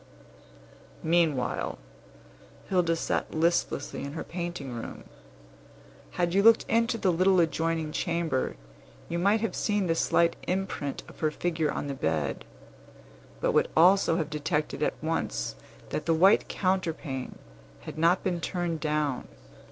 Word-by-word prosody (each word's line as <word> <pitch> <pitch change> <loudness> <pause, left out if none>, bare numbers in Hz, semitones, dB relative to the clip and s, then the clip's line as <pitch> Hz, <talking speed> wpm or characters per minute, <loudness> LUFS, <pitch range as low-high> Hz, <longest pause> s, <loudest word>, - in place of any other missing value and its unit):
Meanwhile, 160 -6 +1 0.9
Hilda 175 -3 +2
sat 165 - -2
listlessly 160 -4 0
in 140 0 -5
her 160 - -4
painting 170 -7 -5
room. 115 - -7 1.1
Had 175 -1 0
you 200 - +4
looked 225 +2 +6
into 230 0 +2
the 190 -4 +2
little 185 +2 +4
adjoining 165 -1 0
chamber, 170 -6 -1 0.5
you 170 - -1
might 200 +4 +3
have 225 - -2
seen 205 -2 0
the 165 - +2
slight 170 0 +2
imprint 185 -7 -2
of - - -14
her 155 - +2
figure 160 0 -1
on - - -3
the 140 - -3
bed, 80 - -2 1.0
but - - +2
would - - +3
also 180 +1 +5
have 160 -3 -2
detected 150 0 -2
at - - +1
once - - -2 0.3
that 155 - -4
the 165 - +4
white 190 +5 +5
counterpane 165 -8 -2 0.4
had - - -8
not 170 +3 +3
been 175 -3 -1
turned 175 -2 -2
down. 150 -4 -1
165 Hz, 135 wpm, -28 LUFS, 150-180 Hz, 1.1 s, looked